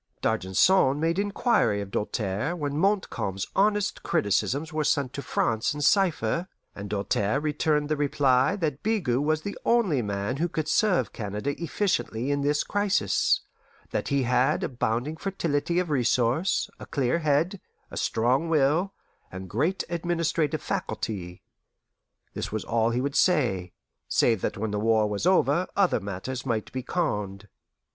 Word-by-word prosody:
D'Argenson 130 - +3
made 165 +3 +1
inquiry 200 - +1
of 100 -1 -6
Doltaire 105 - -2
when 145 -4 -3
Montcalm's 145 - 0
honest 205 0 +1
criticisms 140 - 0
were 155 0 0
sent 140 -3 0
to 140 - -4
France 115 0 0
in 150 - -5
cipher, 170 - +2 0.3
and 100 0 -7
Doltaire 105 +4 0
returned 150 0 0
the 155 - 0
reply 140 +1 +2
that 155 -8 -2
Bigot 180 - 0
was 155 +1 0
the 205 - -4
only 205 - +2
man 100 +3 -2
who 170 +4 0
could 155 -1 -3
serve 190 +4 +2
Canada 105 +4 -3
efficiently 145 - -1
in 145 0 0
this 145 +1 +1
crisis; 205 - +1 0.5
that - - -2
he 140 -1 +1
had 125 +1 +2
abounding 125 +4 -2
fertility 170 -3 -1
of 180 -3 0
resource, 125 +5 +1
a - - -9
clear 140 +2 0
head, 160 +5 +1 0.3
a - - -8
strong 125 +8 +1
will, 160 +5 +2 0.4
and 95 -1 -8
great 160 - 0
administrative 165 -3 -1
faculty. 90 -5 -4 0.9
This - - -4
was 110 0 -3
all 115 0 +1
he 120 +2 0
would 140 +1 -2
say, 115 - +2 0.4
save 115 -5 +2
that - - -2
when 110 +1 -2
the 105 - -1
war 110 0 +3
was 105 - -1
over 180 -2 +3
other 195 -3 +3
matters 100 +6 -5
might 115 -5 -2
be 130 - -3
conned. 105 - -2
140 Hz, 150 wpm, -26 LUFS, 110-170 Hz, 0.9 s, D'Argenson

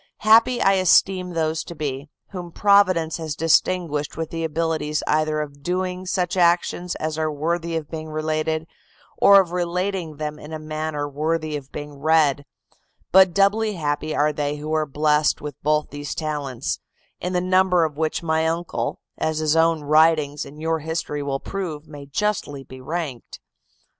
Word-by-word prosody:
Happy 230 +3 +6
I 195 - +4
esteem 185 0 +3
those 160 -1 0
to 170 - -9
be, 145 -1 -4 0.2
whom 180 -3 -7
Providence 185 -5 +3
has 160 -3 -4
distinguished 165 -2 +1
with 160 -1 -4
the 165 0 -3
abilities 160 -1 -1
either 155 0 +1
of 145 -1 -8
doing 185 +2 -2
such 180 -1 -1
actions 175 0 +2
as 155 0 -3
are 155 -1 0
worthy 165 +3 -2
of 155 -2 -6
being 160 -1 -5
related, 155 +1 -1 0.5
or 200 0 +8
of 185 -3 0
relating 180 -1 -2
them 150 0 -4
in 150 +2 -10
a - - -3
manner 155 -1 -3
worthy 155 +2 -2
of 140 -2 -7
being 145 -1 -8
read; 150 -2 +3 0.7
but 190 0 +7
doubly 205 +3 +2
happy 155 -2 -2
are 150 +1 +2
they 145 0 -2
who 150 +1 -5
are 155 -1 +1
blessed 150 +1 +2
with 150 0 -6
both 150 +1 +1
these 145 -1 -5
talents; 145 -6 -3 0.4
in 180 +1 -3
the 180 - +2
number 185 -1 +3
of 155 -2 -4
which 160 +2 -1
my 160 0 +1
uncle, 165 +1 -2 0.2
as 160 -1 0
his 155 0 +1
own 165 -1 +3
writings 155 -1 +3
and 150 +2 -12
your 160 +1 0
history 155 -1 -3
will 140 -1 -2
prove, 160 -6 -5
may 145 -1 -10
justly 145 -5 -2
be 130 -1 -12
ranked. 145 -4 -5
160 Hz, 170 wpm, -23 LUFS, 150-175 Hz, 0.7 s, or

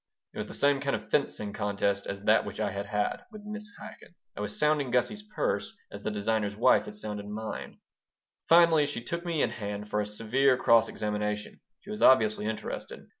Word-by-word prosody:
'" - - -63
It - - -7
was - - -3
the - - -8
same 140 -1 +3
kind 140 -1 0
of - - -8
fencing 105 -8 0
contest 100 -1 0
as 100 0 -5
that 110 +1 +4
which - - -7
I 105 -2 0
had 100 +1 -4
had 105 - -1
with 210 -1 -11
Mrs. 210 0 -6
Chaikin. 175 - -12 0.2
I - - -5
was 105 0 -4
sounding 150 -3 +2
Gussie's 125 - +1
purse 350 - -2
as - - -8
the - - -2
designer's 105 0 -1
wife 110 - +4
had 105 -1 -6
mine. 110 +1 -6 0.7
Finally 165 -3 +6
she 130 -5 -5
took 170 +7 -4
me 170 -4 0
in 115 - 0
hand 105 -2 -5
for 105 - 0
a 105 - -3
severe 125 +5 +2
cross 115 -2 +5
examination. 105 0 -3 0.2
She 205 - -10
was 215 - -5
obviously 110 -4 +5
interested. 110 0 -5
110 Hz, 200 wpm, -29 LUFS, 105-145 Hz, 0.7 s, Finally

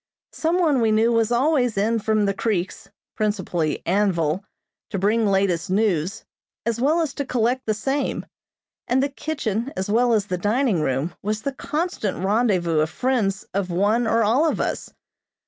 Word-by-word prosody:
Some 330 +2 0
one 300 -8 +3
we 225 -1 +3
knew 220 +2 +3
was 230 -1 +2
always 245 -3 +2
in 225 +3 +1
from 215 -1 +1
the 200 - +1
creeks, 195 -3 -2 0.3
principally 185 -7 -1
Anvil, 180 -3 +1 0.5
to - - -3
bring 210 +3 +2
latest 195 -2 +1
news, 195 -2 0 0.4
as 235 0 -1
well 310 +6 +3
as 305 -4 -2
to 285 - -3
collect 250 -1 0
the 215 - +1
same, 270 +6 -2 0.6
and 260 +2 +2
the 280 - 0
kitchen 270 -5 -3
as 190 +2 -2
well 240 +2 +3
as 210 -3 +2
the 180 -3 -3
dining 210 - +1
room, 135 +4 -1
was 215 +1 -2
the 275 - -2
constant 300 - -2
rendezvous 190 -7 +2
of 155 +1 +1
friends 215 -4 -1
of 195 -1 -1
one 205 +7 +1
or 225 +1 +3
all 260 +10 +3
of - - -2
us. - - -3
215 Hz, 170 wpm, -23 LUFS, 195-245 Hz, 0.6 s, one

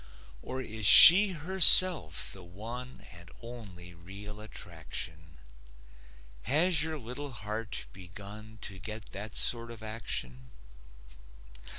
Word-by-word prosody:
Or 130 +1 -10
is 110 -3 -4
she 195 +3 +7
herself 175 - +4
the 95 - -16
one 115 +8 -14
And 85 0 -18
only 100 -7 -16
real 100 +5 -16
attraction? 80 -5 -13 1.0
Has 160 - -2
your 160 0 -7
little 130 +2 -13
heart 105 +1 -11
begun 100 +4 -17
To 95 -3 -12
get 105 +2 -12
that 105 +2 -12
sort 115 -1 -1
of 115 -2 -16
action? 65 - -10
110 Hz, 105 wpm, -24 LUFS, 90-125 Hz, 1.0 s, she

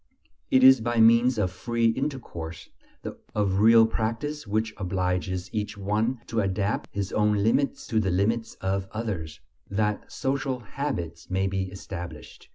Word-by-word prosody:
It 130 - +4
is 130 -2 +8
by 120 +1 0
means 115 +2 +5
of 95 -4 +1
free 115 -1 0
intercourse, 115 - -4 0.7
of 100 -2 +1
real 115 +1 +7
practise 115 +7 -3
which 110 +1 -1
obliges 90 -1 -1
each 105 -1 -3
one 110 +5 -1
to 115 - -2
adapt 100 0 -1
his 100 -1 -3
own 105 -1 +2
limits 125 +5 +1
to 110 - +1
the 100 -3 +1
limits 110 +5 0
of 95 0 -1
others, 100 -9 -4 0.3
that 105 +1 -1
social 135 -1 -2
"habits" 95 - -5
may 95 +1 0
be 95 -1 -1
established. 95 -3 -9
105 Hz, 145 wpm, -26 LUFS, 95-115 Hz, 0.7 s, is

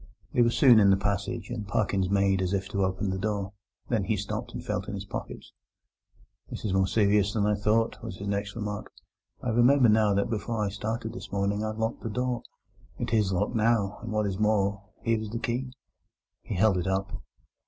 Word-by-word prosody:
They 125 - +3
were 120 - +5
soon 120 -1 +6
in 100 -2 +6
the 95 - +5
passage, 100 +5 -2
and 110 -4 -4
Parkins 95 -1 0
made 100 -1 +2
as 95 +1 -1
if 95 -1 -1
to 100 -2 0
open 95 +1 -1
the 95 - -3
door. 100 -1 -2 0.3
Then 110 -5 0
he 110 0 0
stopped 100 +1 -4
and - - -7
felt - - -2
in - - -4
his - - -6
pockets. - - -7 1.0
"This - - -6
is 100 - 0
more 95 0 +3
serious 100 -1 +3
than 105 -2 +1
I 105 - +3
thought," 105 +2 +1
was 90 - -6
his 100 - -6
next 100 0 -2
remark. 105 -2 -4 0.5
"I 125 - -1
remember 120 +2 +5
now 105 -2 +4
that 100 - +1
before 110 -1 -2
I - - -1
started 110 +3 -4
this - - -9
morning 100 +1 0
I 110 - -1
locked 110 +1 -2
the 115 - -4
door. 125 +3 -1 0.6
It 120 -1 -3
is 105 -3 +3
locked 100 +5 0
now, 110 -3 +1
and, 115 -1 -6
what 105 0 +1
is 95 -1 -2
more, 100 -2 +2 0.2
here 115 -1 +2
is 110 - -5
the 115 - -4
key." 120 +2 -2
And 125 - -11 0.7
he - - -5
held 95 0 +3
it 90 - -3
up. 95 0 -2
105 Hz, 215 wpm, -28 LUFS, 100-115 Hz, 1.0 s, soon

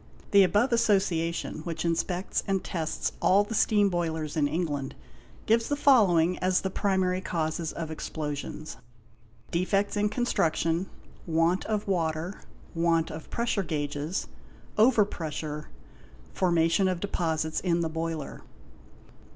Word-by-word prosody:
The 200 -1 +7
above 205 +7 +3
Association, 190 -9 +1
which 160 0 -4
inspects 175 +2 -1
and 195 -1 0
tests 160 -3 -2
all 200 +2 +5
the 205 - -6
steam 210 -2 +3
boilers 160 -4 -2
in 150 -2 +2
England, 145 -4 -2 0.5
gives 225 +1 +2
the 290 - +1
following 190 - +4
as 185 0 +2
the 190 - -3
primary 190 -2 +1
causes 160 -2 -2
of 160 -2 -5
explosions: 155 -1 -5 0.7
defects 195 +4 +1
in 210 0 +1
construction, 175 -6 0 0.4
want 165 +3 +2
of 215 -2 -2
water, 170 0 -1 0.3
want 165 -1 +1
of 155 0 -8
pressure 235 -3 0
gauges, 150 0 -3 0.5
over 220 -1 +5
pressure, 155 -4 -5 0.6
formation 170 +1 +2
of 185 -2 -1
deposits 160 -5 -1
in 170 -2 +1
the 165 - 0
boiler. 160 -2 -4
170 Hz, 125 wpm, -28 LUFS, 160-195 Hz, 0.7 s, The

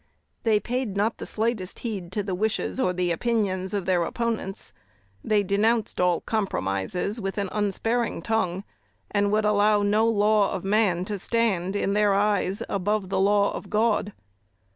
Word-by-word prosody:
They 220 -2 +3
paid 240 -3 -3
not 215 +3 0
the - - -6
slightest 220 -4 -2
heed 195 -6 -4
to 205 - -1
the 195 -1 -3
wishes 215 +6 -1
or 185 - +2
the 180 -1 -1
opinions 190 -2 0
of 200 -3 -2
their 185 -2 +2
opponents. 225 -1 -3 0.5
They 210 -1 +2
denounced 215 +2 +1
all 180 -2 +2
compromises 190 - -2
with 195 0 -4
an 200 -2 -1
unsparing 225 +3 -1
tongue, 195 -5 -1 0.5
and 205 0 +1
would 215 0 +2
allow 210 0 +3
no 215 +3 +3
law 210 -1 +3
of 190 - -4
man 195 -3 +2
to 205 0 -4
stand, 200 -4 0
in 200 -1 0
their 205 -1 +3
eyes, 200 -1 +1
above 200 0 -1
the 190 -1 0
law 200 +1 +3
of 195 - -7
God. 215 -1 +1
205 Hz, 165 wpm, -25 LUFS, 190-215 Hz, 0.5 s, They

